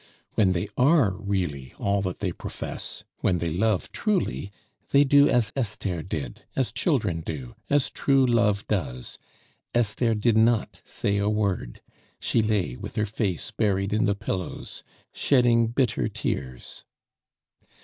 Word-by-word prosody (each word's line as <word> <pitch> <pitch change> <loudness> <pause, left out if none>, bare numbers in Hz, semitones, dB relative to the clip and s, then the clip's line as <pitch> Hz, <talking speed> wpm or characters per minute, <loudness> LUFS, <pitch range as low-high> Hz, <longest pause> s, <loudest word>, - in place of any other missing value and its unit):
When 95 -4 +3
they 85 +3 -1
are 130 - +4
really 90 -10 -3
all 100 0 +1
that 95 -2 -4
they 95 -3 0
profess, - - -6 0.2
when 90 - +2
they 85 -1 -2
love 105 0 +1
truly, 190 - -1 0.4
they 140 +1 +6
do 145 +1 +6
as 115 -4 +2
Esther 100 - -1
did, 75 -6 -5
as - - +1
children 85 -2 0
do, 65 -7 -6 0.2
as 145 -1 +2
true 135 -1 +3
love 115 -4 +2
does; 65 -12 -3 0.6
Esther 115 0 +2
did 110 +1 +2
not 115 0 +2
say 100 0 -1
a 100 +1 +1
word, 100 - -1 0.4
she 115 - +1
lay 105 - 0
with - - -8
her 110 -2 +1
face 100 -5 -2
buried 100 -2 0
in 105 - +2
the 100 - +2
pillows, 95 -3 -5 0.3
shedding 120 -4 +4
bitter 120 +1 +1
tears. 65 -2 -4
105 Hz, 140 wpm, -26 LUFS, 90-115 Hz, 0.6 s, they